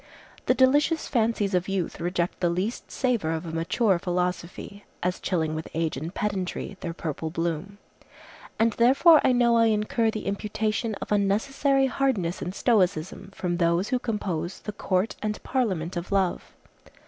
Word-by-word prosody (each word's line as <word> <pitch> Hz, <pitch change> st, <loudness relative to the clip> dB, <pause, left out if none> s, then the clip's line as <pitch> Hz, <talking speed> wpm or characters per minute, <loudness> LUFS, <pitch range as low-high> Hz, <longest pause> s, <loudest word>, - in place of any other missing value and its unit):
The -, -, +4 dB
delicious 290 Hz, +5 st, +3 dB
fancies 220 Hz, -5 st, +1 dB
of 180 Hz, 0 st, +1 dB
youth 195 Hz, -3 st, -2 dB
reject 175 Hz, 0 st, -1 dB
the 175 Hz, -, +2 dB
least 185 Hz, +7 st, -3 dB
savor 240 Hz, -, 0 dB
of 160 Hz, +1 st, -4 dB
a 165 Hz, -, -5 dB
mature 170 Hz, +4 st, +1 dB
philosophy, 180 Hz, +2 st, -3 dB, 0.2 s
as 180 Hz, 0 st, -1 dB
chilling 160 Hz, -4 st, -1 dB
with 155 Hz, 0 st, -4 dB
age 165 Hz, -1 st, 0 dB
and 155 Hz, +6 st, -5 dB
pedantry 200 Hz, -1 st, -3 dB
their 170 Hz, -, -4 dB
purple 160 Hz, -1 st, -4 dB
bloom. 170 Hz, +4 st, -3 dB, 0.8 s
And 225 Hz, 0 st, +3 dB
therefore 275 Hz, +8 st, +6 dB
I -, -, +4 dB
know 240 Hz, -1 st, +4 dB
I 230 Hz, -, +5 dB
incur 220 Hz, +1 st, +1 dB
the 215 Hz, -1 st, -4 dB
imputation 215 Hz, +2 st, -2 dB
of -, -, -8 dB
unnecessary 270 Hz, +7 st, +2 dB
hardness 250 Hz, -10 st, 0 dB
and 180 Hz, +2 st, -4 dB
stoicism 185 Hz, -7 st, +1 dB
from 175 Hz, -1 st, -2 dB
those 170 Hz, +2 st, +1 dB
who 255 Hz, -, +1 dB
compose 195 Hz, -7 st, -3 dB
the 210 Hz, -, -5 dB
Court 190 Hz, +1 st, -1 dB
and 210 Hz, 0 st, -2 dB
Parliament 190 Hz, -10 st, -1 dB
of 175 Hz, +2 st, -5 dB
Love. 190 Hz, -3 st, 0 dB
195 Hz, 160 wpm, -26 LUFS, 175-230 Hz, 0.8 s, therefore